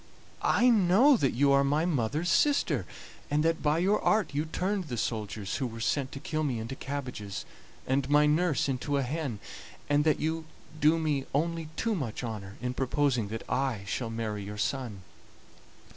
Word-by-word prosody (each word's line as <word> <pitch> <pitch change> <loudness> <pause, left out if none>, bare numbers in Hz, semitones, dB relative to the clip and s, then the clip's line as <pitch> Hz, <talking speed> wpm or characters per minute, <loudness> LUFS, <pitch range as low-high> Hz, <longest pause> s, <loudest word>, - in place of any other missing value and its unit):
I 245 - +3
know 225 +5 +6
that 135 - +1
you 140 +3 +4
are 140 0 +5
my 145 +4 +1
mother's 155 +2 0
sister, 150 - +2 0.4
and 150 +2 +1
that 165 0 +1
by 150 +1 +2
your 195 +5 +2
art 215 -7 +2
you 150 +2 0
turned 185 +4 -1
the 125 -6 -5
soldiers 105 -2 -3
who 130 - -1
were 115 -1 -8
sent 130 +4 0
to 140 - -6
kill 155 +2 -2
me 135 -5 -1
into 115 +4 -5
cabbages, 125 -8 -5 0.4
and 135 +1 0
my 150 +1 +5
nurse 150 0 +2
into 140 +2 -1
a 140 - +1
hen, 140 -3 -3 0.5
and 145 0 +3
that 155 -1 +2
you 160 +1 -2 0.3
do 155 +2 +4
me 150 -4 -1
only 165 +1 -1
too 230 +5 0
much 130 - -3
honor 105 -4 -6
in 125 0 -1
proposing 130 -3 +1
that 110 +2 -6
I 125 -4 -1
shall 115 +3 -3
marry 110 -2 -3
your 105 +1 -7
son. 110 -4 -3
140 Hz, 180 wpm, -29 LUFS, 115-160 Hz, 0.5 s, know